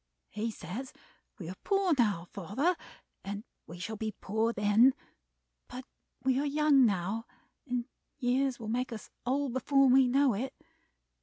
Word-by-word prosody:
He 215 +2 -2
says 215 +6 -7 0.4
we 170 - -7
are 180 - -5
poor 390 -3 +2
now, 210 -9 +1
father, 225 - 0 0.5
and 205 +2 -5 0.2
we 170 - -9
shall 215 +5 -5
be 215 0 -4
poor 220 +3 0
then, 220 +5 +4 0.7
but 255 +1 -8 0.4
we 260 0 +2
are 290 - 0
young 285 -3 +5
now, 200 +3 -2 0.4
and 245 -2 -1 0.3
years 260 0 +1
will 225 - -6
make 245 +3 -1
us 220 -2 -8 0.2
old 270 0 0
before 275 +2 +3
we 260 0 +6
know 270 0 +3
it. 255 +6 -4
245 Hz, 150 wpm, -31 LUFS, 210-270 Hz, 0.7 s, we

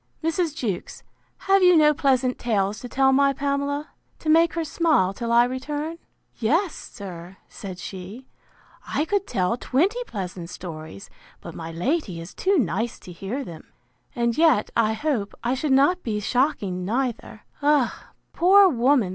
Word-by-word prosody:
—Mrs. 325 -1 0
Jewkes, 210 - -4 0.4
have 390 0 +4
you 360 -2 +6
no 300 -1 +5
pleasant 260 -3 +1
tales 210 -3 0
to 245 - -8
tell 265 +1 +3
my 275 +1 +4
Pamela, 280 +2 -2 0.3
to 315 - -4
make 330 +1 +5
her 335 - 0
smile, 305 - +2
till 235 +3 -4
I 235 +1 +6
return?—Yes, 295 - -3
sir, 185 -3 -9
said 190 -3 -8
she, 195 +7 -8 0.6
I 300 - 0
could 400 +3 -1
tell 185 +5 0
twenty 380 - 0
pleasant 180 -4 -6
stories; 155 - -9 0.3
but - - -9
my 165 0 -7
lady 185 - -2
is 165 +2 -9
too 390 +1 +1
nice 225 - -1
to 180 - -12
hear 195 +10 -5
them; 165 -9 -11 0.4
and 235 -1 0
yet, 315 -9 +3
I 220 -1 +2
hope, 220 -5 -2
I 240 +1 +1
should 275 +2 -1
not 285 +7 +4
be 215 -7 -2
shocking 210 -6 0
neither. 230 0 -3 0.2
Ah! 290 -3 +1 0.2
poor 385 +3 +6
woman! 250 - +2
255 Hz, 155 wpm, -24 LUFS, 200-305 Hz, 0.6 s, you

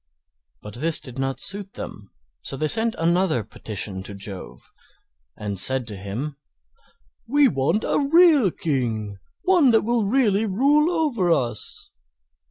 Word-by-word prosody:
But 105 - -9
this 155 +7 +1
did 130 -2 -9
not 135 0 -2
suit 195 0 -2
them, 105 -1 -8 0.3
so 135 - -5
they 155 - 0
sent 225 +6 +1
another 170 - +1
petition 100 -3 -5
to 100 +1 -8
Jove, 100 -1 -9 0.7
and 100 -2 -4
said 130 +4 +3
to 105 - -7
him: 110 +10 -5 0.9
"We 285 +3 +4
want 140 - 0
a 280 -1 0
real 325 - +6
King; 115 - -3 0.2
one 355 -7 +4
that 225 -2 +4
will 235 -1 0
really 220 -3 +2
rule 285 - +3
over 295 - 0
us." 120 -8 -2
165 Hz, 140 wpm, -23 LUFS, -, 0.9 s, real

